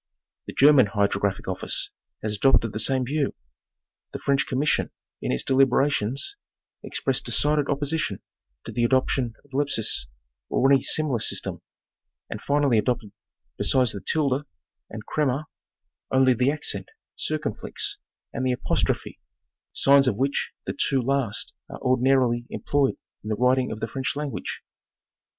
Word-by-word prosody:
The -, -, -6 dB
German 140 Hz, -4 st, +6 dB
Hydrographic 100 Hz, -1 st, 0 dB
Office 95 Hz, -, -1 dB, 0.3 s
has 105 Hz, -1 st, 0 dB
adopted 115 Hz, -1 st, +3 dB
the 110 Hz, -, -2 dB
same 130 Hz, +3 st, +2 dB
view. 145 Hz, +2 st, -1 dB, 0.8 s
The -, -, -3 dB
French 140 Hz, -1 st, +1 dB
Commission 140 Hz, +4 st, +1 dB, 0.3 s
in -, -, -1 dB
its 65 Hz, -, 0 dB
deliberations 135 Hz, -, +2 dB, 0.4 s
expressed -, -, -1 dB
decided 150 Hz, -1 st, +2 dB
opposition 145 Hz, +3 st, -1 dB, 0.4 s
to -, -, -7 dB
the 120 Hz, -, -1 dB
adoption 130 Hz, -1 st, +1 dB
of 145 Hz, -, -26 dB
Lepsius' 135 Hz, -, 0 dB, 0.4 s
or 135 Hz, +2 st, +3 dB
any 135 Hz, -, +5 dB
similar 145 Hz, -6 st, 0 dB
system, -, -, -2 dB, 0.7 s
and -, -, -5 dB
finally 140 Hz, -5 st, +2 dB
adopted 110 Hz, -1 st, -1 dB, 0.5 s
besides 130 Hz, -3 st, +3 dB
the 100 Hz, -, -7 dB
"tilde" 145 Hz, -3 st, +1 dB, 0.5 s
and 110 Hz, 0 st, -8 dB
"crema," 150 Hz, 0 st, 0 dB, 0.6 s
only 130 Hz, -1 st, +4 dB
the 125 Hz, +3 st, +2 dB
accent 145 Hz, -10 st, -2 dB, 0.3 s
"circonfiex" -, -, -2 dB, 0.4 s
and 130 Hz, -, -3 dB
the 130 Hz, -1 st, +2 dB
"apostrophe," 125 Hz, -, -1 dB, 0.5 s
signs 140 Hz, 0 st, +5 dB
of 110 Hz, -, +2 dB
which 135 Hz, +3 st, 0 dB
the -, -, -3 dB
two 135 Hz, -, +1 dB
last 130 Hz, -3 st, -1 dB, 0.2 s
are -, -, -7 dB
ordinarily 125 Hz, -2 st, +2 dB
em -, -, -5 dB
ployed 140 Hz, -2 st, +1 dB, 0.2 s
in 105 Hz, -, -7 dB
the 110 Hz, -, 0 dB
writing 125 Hz, +3 st, +2 dB
of 110 Hz, -, -5 dB
the -, -, -1 dB
French 130 Hz, +5 st, -3 dB
language. 145 Hz, -1 st, -4 dB
130 Hz, 140 wpm, -25 LUFS, 115-140 Hz, 0.8 s, German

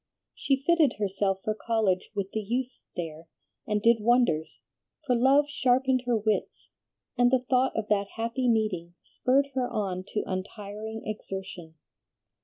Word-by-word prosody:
She 275 Hz, -, +1 dB
fitted 310 Hz, -2 st, +3 dB
herself 195 Hz, -1 st, -1 dB
for 215 Hz, -, 0 dB
college 215 Hz, -4 st, 0 dB
with 195 Hz, -1 st, -2 dB
the 220 Hz, -, -2 dB
youths 245 Hz, +4 st, -3 dB
there, 165 Hz, -1 st, -6 dB, 0.4 s
and 210 Hz, -1 st, 0 dB
did 235 Hz, 0 st, +6 dB
wonders; 215 Hz, -9 st, +1 dB, 0.4 s
for 250 Hz, -3 st, +2 dB
love 270 Hz, +4 st, +5 dB
sharpened 260 Hz, -2 st, +2 dB
her 240 Hz, -2 st, +3 dB
wits, 215 Hz, 0 st, -2 dB, 0.5 s
and 245 Hz, 0 st, +6 dB
the 255 Hz, 0 st, +1 dB
thought 260 Hz, 0 st, +2 dB
of 220 Hz, -1 st, -2 dB
that 200 Hz, -1 st, +2 dB
happy 230 Hz, +2 st, 0 dB
meeting 190 Hz, -7 st, 0 dB
spurred 275 Hz, +2 st, +1 dB
her 255 Hz, -1 st, -1 dB
on 185 Hz, -3 st, -2 dB
to 210 Hz, -, 0 dB
untiring 210 Hz, +3 st, -5 dB
exertion. 190 Hz, -5 st, -6 dB
220 Hz, 145 wpm, -28 LUFS, 195-250 Hz, 0.5 s, did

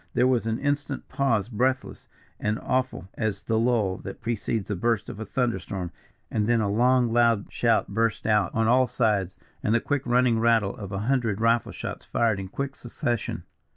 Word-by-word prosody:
There 125 Hz, -, +4 dB
was 125 Hz, -3 st, +2 dB
an 110 Hz, 0 st, 0 dB
instant's 145 Hz, 0 st, -2 dB
pause, 115 Hz, -7 st, +1 dB
breathless 130 Hz, +3 st, -1 dB, 0.3 s
and 105 Hz, +1 st, 0 dB
awful 130 Hz, -6 st, -1 dB
as 110 Hz, -3 st, -2 dB
the 110 Hz, -1 st, +1 dB
lull 110 Hz, -6 st, +1 dB
that -, -, -8 dB
precedes 115 Hz, -2 st, -2 dB
the 105 Hz, -, -2 dB
burst 115 Hz, +3 st, 0 dB
of -, -, -8 dB
a 110 Hz, -, -5 dB
thunderstorm; 105 Hz, -7 st, -2 dB, 0.4 s
and 105 Hz, -1 st, 0 dB
then 120 Hz, 0 st, +3 dB
a 100 Hz, -2 st, 0 dB
long 120 Hz, +1 st, +3 dB
loud 115 Hz, -3 st, +3 dB
shout -, -, +2 dB
burst 115 Hz, +2 st, 0 dB
out 105 Hz, -4 st, +2 dB
on 115 Hz, 0 st, +2 dB
all 125 Hz, +2 st, +4 dB
sides, 105 Hz, -6 st, 0 dB, 0.3 s
and 110 Hz, -, +1 dB
the -, -, +4 dB
quick 145 Hz, +3 st, -1 dB
running 120 Hz, -1 st, +3 dB
rattle 115 Hz, -3 st, +2 dB
of 100 Hz, -2 st, -8 dB
a 100 Hz, -, -3 dB
hundred 120 Hz, -6 st, +1 dB
rifle 115 Hz, +1 st, +2 dB
shots -, -, -6 dB
fired 110 Hz, -4 st, +1 dB
in 95 Hz, -, -5 dB
quick 140 Hz, +7 st, -4 dB
succession. 120 Hz, -2 st, -3 dB
115 Hz, 190 wpm, -26 LUFS, 105-125 Hz, 0.4 s, There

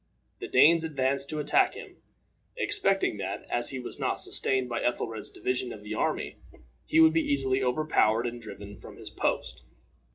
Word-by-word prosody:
The -, -, -6 dB
Danes 165 Hz, +1 st, +5 dB
advanced 140 Hz, -3 st, 0 dB
to 155 Hz, -, -4 dB
attack 150 Hz, -1 st, +2 dB
him, -, -, -11 dB, 0.6 s
expecting 195 Hz, -, +1 dB
that, 95 Hz, -1 st, -5 dB
as 120 Hz, -, +2 dB
he 135 Hz, -, -5 dB
was 125 Hz, -, -8 dB
not -, -, -1 dB
sustained 130 Hz, -1 st, +3 dB
by 120 Hz, -1 st, -3 dB
Ethelred's 115 Hz, -2 st, -3 dB
division 125 Hz, -1 st, -3 dB
of 105 Hz, -, -10 dB
the 105 Hz, +1 st, -6 dB
army, -, -, -2 dB, 0.5 s
he 160 Hz, -, +2 dB
would 160 Hz, 0 st, +6 dB
be 165 Hz, -, +2 dB
easily 135 Hz, -1 st, 0 dB
overpowered 125 Hz, -4 st, +1 dB
and 120 Hz, 0 st, -5 dB
driven 100 Hz, -2 st, -10 dB
from -, -, -13 dB
his -, -, -10 dB
post. -, -, -2 dB
130 Hz, 170 wpm, -27 LUFS, 115-150 Hz, 0.6 s, would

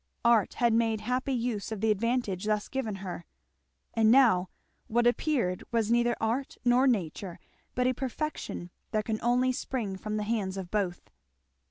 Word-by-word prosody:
Art 235 Hz, -4 st, +4 dB
had 235 Hz, -2 st, +3 dB
made 225 Hz, -1 st, +2 dB
happy 250 Hz, +5 st, -1 dB
use 235 Hz, -4 st, -2 dB
of 220 Hz, -, -3 dB
the 220 Hz, +1 st, +2 dB
advantage 215 Hz, -3 st, 0 dB
thus 210 Hz, -1 st, 0 dB
given 230 Hz, -6 st, -3 dB
her; 175 Hz, -1 st, -5 dB, 0.7 s
and 220 Hz, -1 st, +4 dB
now 225 Hz, -8 st, +5 dB, 0.4 s
what 240 Hz, +2 st, +2 dB
appeared 240 Hz, -, +1 dB
was 230 Hz, -2 st, +1 dB
neither 240 Hz, 0 st, +3 dB
art 235 Hz, +5 st, -1 dB
nor 245 Hz, +2 st, +5 dB
nature, 185 Hz, -5 st, -1 dB, 0.4 s
but 250 Hz, -, +1 dB
a 255 Hz, -, +3 dB
perfection 260 Hz, -, -4 dB, 0.2 s
that 215 Hz, -1 st, -1 dB
can 220 Hz, -1 st, -1 dB
only 250 Hz, +2 st, +3 dB
spring 230 Hz, -6 st, -3 dB
from 215 Hz, +2 st, -3 dB
the 210 Hz, -, -1 dB
hands 205 Hz, -3 st, -1 dB
of 185 Hz, -2 st, -6 dB
both. 190 Hz, -5 st, -2 dB
225 Hz, 165 wpm, -29 LUFS, 205-245 Hz, 0.7 s, now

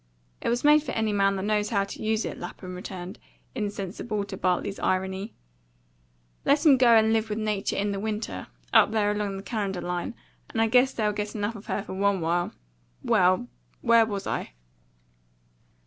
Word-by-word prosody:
"It -, -, -1 dB
was 240 Hz, +1 st, 0 dB
made 300 Hz, +1 st, +6 dB
for 310 Hz, -, -5 dB
any 220 Hz, -2 st, 0 dB
man 195 Hz, -1 st, +3 dB
that 190 Hz, -, -3 dB
knows 210 Hz, 0 st, +1 dB
how 200 Hz, -3 st, +2 dB
to 200 Hz, -, -8 dB
use 220 Hz, 0 st, 0 dB
it," -, -, -5 dB
Lapham 185 Hz, -1 st, -7 dB
returned, 180 Hz, +1 st, -7 dB, 0.3 s
insensible 205 Hz, +1 st, -3 dB
to 200 Hz, -1 st, -7 dB
Bartley's 185 Hz, +2 st, -1 dB
irony. 190 Hz, +3 st, -1 dB, 1.1 s
"Let 290 Hz, +3 st, +3 dB
'em 280 Hz, -4 st, +7 dB
go 240 Hz, -2 st, +6 dB
and 220 Hz, 0 st, +5 dB
live 220 Hz, 0 st, +1 dB
with 210 Hz, -, -2 dB
nature 210 Hz, -2 st, -1 dB
in 205 Hz, +1 st, 0 dB
the 200 Hz, -, -3 dB
WINTER, 215 Hz, +1 st, -4 dB, 0.3 s
up -, -, +7 dB
there 210 Hz, -1 st, +1 dB
along 205 Hz, -2 st, -2 dB
the 195 Hz, -, -8 dB
Canada 200 Hz, -4 st, -2 dB
line, 175 Hz, 0 st, -3 dB, 0.3 s
and -, -, -3 dB
I 225 Hz, -, +5 dB
guess 255 Hz, +3 st, +5 dB
they'll 210 Hz, -2 st, 0 dB
get 210 Hz, +1 st, -4 dB
enough 210 Hz, +2 st, -2 dB
of 205 Hz, -, -11 dB
her 200 Hz, -, -2 dB
for 205 Hz, -, -7 dB
one 200 Hz, 0 st, +1 dB
while. 170 Hz, +1 st, 0 dB, 0.5 s
Well 185 Hz, 0 st, +3 dB, 0.4 s
where 230 Hz, -1 st, +5 dB
was 200 Hz, -2 st, -4 dB
I?" -, -, -3 dB
205 Hz, 185 wpm, -26 LUFS, 195-220 Hz, 1.1 s, em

